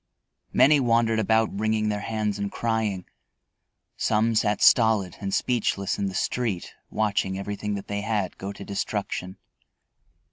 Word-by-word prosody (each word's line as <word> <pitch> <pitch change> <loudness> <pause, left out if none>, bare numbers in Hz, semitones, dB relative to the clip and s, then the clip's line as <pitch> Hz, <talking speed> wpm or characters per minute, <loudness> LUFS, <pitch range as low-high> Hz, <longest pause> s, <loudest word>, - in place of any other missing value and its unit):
Many 145 +1 +5
wandered 115 -3 +2
about 110 -1 +1
wringing 110 0 +1
their 105 -1 -1
hands 105 -1 -2
and 100 0 -2
crying; 110 -5 -1 0.9
some 110 +2 +1
sat 105 -1 +1
stolid 110 -6 +4
and 100 -1 -3
speechless 105 -4 0
in 100 - 0
the 95 - -5
street 110 -6 -2 0.2
watching 100 -3 0
everything 105 +1 -3
that 100 - -6
they 100 0 -3
had 105 -3 -1
go 100 +1 -4
to 100 0 -9
destruction. 100 -2 -3
105 Hz, 140 wpm, -25 LUFS, 100-110 Hz, 0.9 s, Many